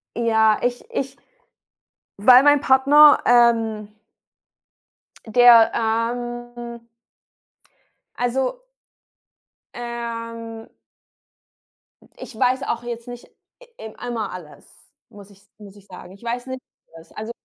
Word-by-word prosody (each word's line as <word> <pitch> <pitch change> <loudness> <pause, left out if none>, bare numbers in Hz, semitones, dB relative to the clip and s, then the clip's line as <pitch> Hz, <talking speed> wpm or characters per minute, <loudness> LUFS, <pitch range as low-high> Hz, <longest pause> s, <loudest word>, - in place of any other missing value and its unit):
Ja, 220 -2 +2
ich 245 0 -2
ich 270 0 -4 1.0
Weil 250 +5 +6
mein 290 -1 +4
Partner, 285 +3 +5
ähm 225 -3 +2 1.4
Der, 235 0 +6
ähm 235 +1 -4 1.3
also 260 - -2 1.1
ähm. 230 -1 -7 1.5
ich 220 - -11
weiß 255 +2 0
auch 235 -3 -4
jetzt 235 0 -7
nicht 245 0 -11 0.5
e 220 0 -9
einmal 235 -4 -5
alles, 175 -5 -12 0.4
muss 205 -3 -15
ich 195 0 -21 0.2
muss 205 -2 -14
ich 200 -1 -19
sagen. 180 0 -13
Ich 200 +4 -19
weiß 245 +2 -5
nicht 260 0 -7 0.3
alles. 165 0 -16
Also, 220 +2 -7
235 Hz, 100 wpm, -21 LUFS, 220-245 Hz, 1.5 s, Weil